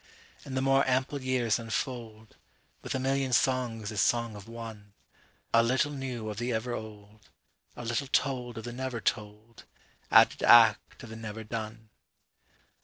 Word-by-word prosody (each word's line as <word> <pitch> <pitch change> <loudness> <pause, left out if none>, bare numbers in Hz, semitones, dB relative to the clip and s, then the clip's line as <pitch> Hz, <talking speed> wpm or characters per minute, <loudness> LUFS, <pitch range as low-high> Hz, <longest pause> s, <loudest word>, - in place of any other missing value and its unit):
48And 135 - -6
the 130 - 0
more 135 0 +4
ample 130 +2 0
years 125 -5 +1
unfold49(With 115 -1 -7
a - - 0
million 135 0 0
songs 115 -3 +1
as 105 -2 0
song 115 -2 +1
of 100 -1 -10
one)50A 115 0 -4
little 130 +4 +1
new 130 -5 -5
of 105 -2 -5
the 120 +2 -2
ever 120 +2 -2
old,51A 110 +2 -11
little 120 +4 -1
told 125 -3 -1
of 110 - -6
the 120 - -6
never 130 -1 -4
told,52Added 105 +2 0
act - - +5
of 120 - -9
the - - -7
never 110 0 -7
done. 110 0 -6
115 Hz, 140 wpm, -29 LUFS, 110-130 Hz, -, act